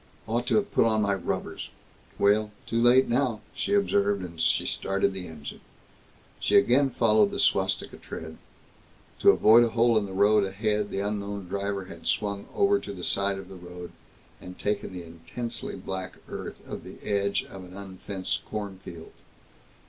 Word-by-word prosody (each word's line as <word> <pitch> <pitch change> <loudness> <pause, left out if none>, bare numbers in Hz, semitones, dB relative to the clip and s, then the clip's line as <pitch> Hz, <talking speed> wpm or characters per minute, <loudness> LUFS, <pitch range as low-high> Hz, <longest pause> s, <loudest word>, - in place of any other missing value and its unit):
Ought 120 +2 -1
to - - +2
have 205 -1 +1
put - - +4
on 110 -1 +2
my 100 -1 +2
rubbers. 95 - -3 0.5
Well 105 +1 +3 0.2
too 115 0 0
late 125 +2 +6
now," 120 -3 +1
she 200 - 0
observed, 100 - +2
as 80 - -6
she 80 - +2
started 95 0 0
the 95 -1 -6
engine. 75 -3 -9 0.8
She - - +1
again 135 +3 +4
followed 110 -4 +4
the - - -5
swastika - - +1
tread. 80 0 -8 0.8
To - - +6
avoid 115 +2 +7
a 120 - +2
hole 115 0 +4
in 100 - -4
the 95 - -8
road 105 +2 +4
ahead, 105 +2 -1
the 100 - -2
unknown 100 -1 -3
driver 100 0 -2
had 85 -2 -10
swung 100 -1 -1
over 200 0 +4
to 100 - -7
the 90 -2 -8
side 100 +1 +2
of 95 - -8
the 95 - -11
road, 90 -1 -9 0.5
and 90 0 -10
taken 105 0 -1
to 95 - -10
the 90 - -6
intensely 85 +9 -4
black 95 -1 -5
earth - - -7
of - - -6
the - - -10
edge 100 -1 0
of 95 -1 -10
an 90 +1 -11
unfenced 95 -1 -4
cornfield. 95 -5 -7
100 Hz, 175 wpm, -27 LUFS, 95-110 Hz, 0.8 s, avoid